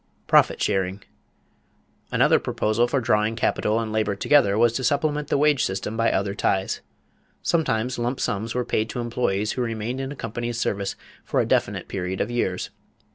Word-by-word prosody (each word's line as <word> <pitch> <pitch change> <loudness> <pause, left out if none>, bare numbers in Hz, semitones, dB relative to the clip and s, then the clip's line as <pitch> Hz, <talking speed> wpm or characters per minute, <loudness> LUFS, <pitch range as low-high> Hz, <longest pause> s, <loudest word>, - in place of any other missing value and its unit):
=Profit - - +4
sharing.= 95 -1 -1 1.1
Another - - +4
proposal 110 +3 0
for 135 - +1
drawing 110 -1 +1
capital 110 -1 +1
and 110 -1 -3
labor 110 -2 0
together 100 -3 +3
was 115 0 +4
to 130 - -2
supplement 145 +2 +1
the - - +1
wage 145 -2 +3
system 95 +3 -2
by 115 0 +2
other 100 +1 0
ties. 95 -1 0 0.6
Sometimes 125 -7 0
lump 120 +3 -1
sums 110 +4 -2
were 125 -1 0
paid 110 +1 0
to 125 - -4
employees 115 -4 -1
who 125 - -2
remained 115 +2 -3
in 135 0 -4
a - - -6
company's 120 0 -4
service 100 -3 -1 0.3
for - - -1
a - - +2
definite - - 0
period 95 0 -3
of - - -1
years. 95 -7 -1
115 Hz, 175 wpm, -24 LUFS, 105-125 Hz, 1.1 s, =Profit